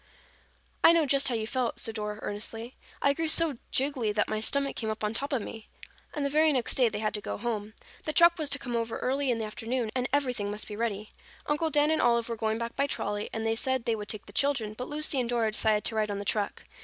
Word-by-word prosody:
"I 335 Hz, -, +9 dB
know 330 Hz, -2 st, +4 dB
just 275 Hz, 0 st, +3 dB
how 245 Hz, -, 0 dB
you 220 Hz, -1 st, -1 dB
felt," 245 Hz, +1 st, -1 dB
said 225 Hz, -, -2 dB
Dora 210 Hz, -1 st, -4 dB
earnestly. 225 Hz, +4 st, -4 dB, 0.3 s
"I 280 Hz, -, +5 dB
grew 325 Hz, +2 st, -1 dB
so 310 Hz, -5 st, +4 dB
jiggly 260 Hz, -5 st, +1 dB
that 210 Hz, -, +2 dB
my 215 Hz, -, -1 dB
stomach 275 Hz, +5 st, +1 dB
came 220 Hz, -, -2 dB
up 215 Hz, 0 st, -4 dB
on 210 Hz, +1 st, 0 dB
top 280 Hz, +6 st, -1 dB
of 255 Hz, -6 st, 0 dB
me." 220 Hz, -1 st, -9 dB, 0.5 s
And 290 Hz, -2 st, -1 dB
the -, -, +1 dB
very 310 Hz, +1 st, +4 dB
next 255 Hz, -5 st, +1 dB
day 250 Hz, -3 st, +3 dB
they 210 Hz, -, -4 dB
had 215 Hz, 0 st, -1 dB
to 210 Hz, -, -2 dB
go -, -, -4 dB
home. 215 Hz, -1 st, -3 dB, 0.3 s
The 310 Hz, -, 0 dB
truck 340 Hz, +2 st, +6 dB
was 305 Hz, -2 st, -1 dB
to 280 Hz, -, +1 dB
come 245 Hz, -3 st, -4 dB
over 230 Hz, -1 st, -1 dB
early 270 Hz, +1 st, 0 dB
in 240 Hz, -, +2 dB
the 220 Hz, -, -2 dB
afternoon 225 Hz, +2 st, -3 dB
and 255 Hz, 0 st, 0 dB
everything 250 Hz, -7 st, 0 dB
must 210 Hz, +1 st, -3 dB
be 210 Hz, -, -6 dB
ready. 215 Hz, -2 st, -3 dB, 0.3 s
Uncle 295 Hz, +2 st, 0 dB
Dan 295 Hz, +1 st, +3 dB
and 315 Hz, -, +2 dB
Olive 235 Hz, -1 st, +2 dB
were 230 Hz, -, -2 dB
going 220 Hz, 0 st, -1 dB
back 235 Hz, 0 st, -4 dB
by 280 Hz, -, +1 dB
trolley 205 Hz, -5 st, -2 dB
and 225 Hz, 0 st, -3 dB
they 225 Hz, -, +2 dB
said 260 Hz, +1 st, -1 dB
they 230 Hz, -, +1 dB
would 210 Hz, -1 st, -7 dB
take 215 Hz, -2 st, -3 dB
the 200 Hz, -, -13 dB
children, 245 Hz, -5 st, +1 dB
but 250 Hz, +4 st, -6 dB
Lucy 300 Hz, -2 st, 0 dB
and 240 Hz, -2 st, -1 dB
Dora 230 Hz, -3 st, +1 dB
decided 215 Hz, -1 st, +2 dB
to -, -, -1 dB
ride 215 Hz, -1 st, +1 dB
on 200 Hz, -, -2 dB
the 200 Hz, -, -5 dB
truck. 205 Hz, -1 st, -1 dB
235 Hz, 265 wpm, -29 LUFS, 215-280 Hz, 0.5 s, I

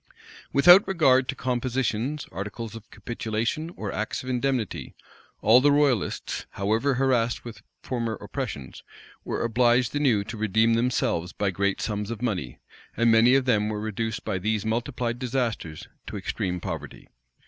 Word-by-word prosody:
Without 175 Hz, +8 st, +7 dB
regard 130 Hz, -9 st, +3 dB
to -, -, -1 dB
compositions, 130 Hz, +2 st, -1 dB
articles 105 Hz, +5 st, -6 dB
of 110 Hz, -1 st, -11 dB
capitulation, 115 Hz, +7 st, -3 dB
or 105 Hz, -, -4 dB
acts 110 Hz, +4 st, -3 dB
of 130 Hz, -, -6 dB
indemnity, 125 Hz, -3 st, -2 dB, 0.5 s
all 115 Hz, +4 st, +7 dB
the 145 Hz, +2 st, +5 dB
royalists, 140 Hz, -7 st, 0 dB
however 110 Hz, +8 st, +1 dB
harassed 125 Hz, -3 st, +1 dB
with 110 Hz, -3 st, -9 dB, 0.2 s
former 115 Hz, -3 st, -2 dB
oppressions, 65 Hz, -, -6 dB, 0.4 s
were -, -, -3 dB
obliged 120 Hz, +2 st, +2 dB
anew 130 Hz, -9 st, +2 dB
to 115 Hz, +3 st, -7 dB
redeem 110 Hz, +2 st, +2 dB
themselves 115 Hz, -7 st, 0 dB
by 100 Hz, -2 st, -1 dB
great 100 Hz, +1 st, 0 dB
sums 105 Hz, -1 st, -3 dB
of 115 Hz, -2 st, -4 dB
money; 95 Hz, -, -3 dB, 0.4 s
and 115 Hz, 0 st, +4 dB
many 115 Hz, +3 st, +6 dB
of 135 Hz, -1 st, +2 dB
them 105 Hz, -4 st, +2 dB
were 105 Hz, -1 st, -3 dB
reduced 110 Hz, +1 st, -3 dB
by 95 Hz, -, -1 dB
these 110 Hz, +2 st, -1 dB
multiplied 120 Hz, +1 st, -2 dB
disasters 120 Hz, -, -3 dB, 0.2 s
to -, -, -5 dB
extreme 90 Hz, -1 st, -3 dB
poverty. 80 Hz, -6 st, -7 dB
115 Hz, 150 wpm, -26 LUFS, 105-125 Hz, 0.5 s, Without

